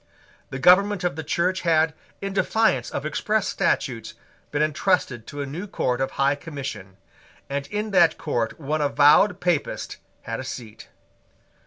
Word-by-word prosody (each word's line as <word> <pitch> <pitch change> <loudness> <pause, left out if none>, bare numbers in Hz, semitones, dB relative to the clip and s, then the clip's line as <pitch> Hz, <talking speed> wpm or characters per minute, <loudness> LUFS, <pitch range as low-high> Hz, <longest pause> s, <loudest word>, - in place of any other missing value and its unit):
The 130 - -5
government 185 +6 +5
of 175 -5 0
the 160 - -5
Church 180 +5 0
had, 160 -2 +2 0.3
in 195 0 -3
defiance 190 - +1
of 140 - -4
express 210 +7 0
statutes, 130 - -1 0.3
been 150 +1 0
entrusted 155 - 0
to 145 0 -5
a - - -4
new 165 +9 -6
court 125 -9 -1
of 135 - 0
High 140 +1 +3
Commission; 140 - -7 0.5
and 140 0 -2
in 210 +5 -3
that 175 -4 +4
court 120 -6 -2
one 155 +1 -2
avowed 150 +6 +5
Papist 175 -5 -1 0.3
had 115 - -4
a - - -4
seat. 115 -4 -8
155 Hz, 155 wpm, -24 LUFS, 135-180 Hz, 0.5 s, government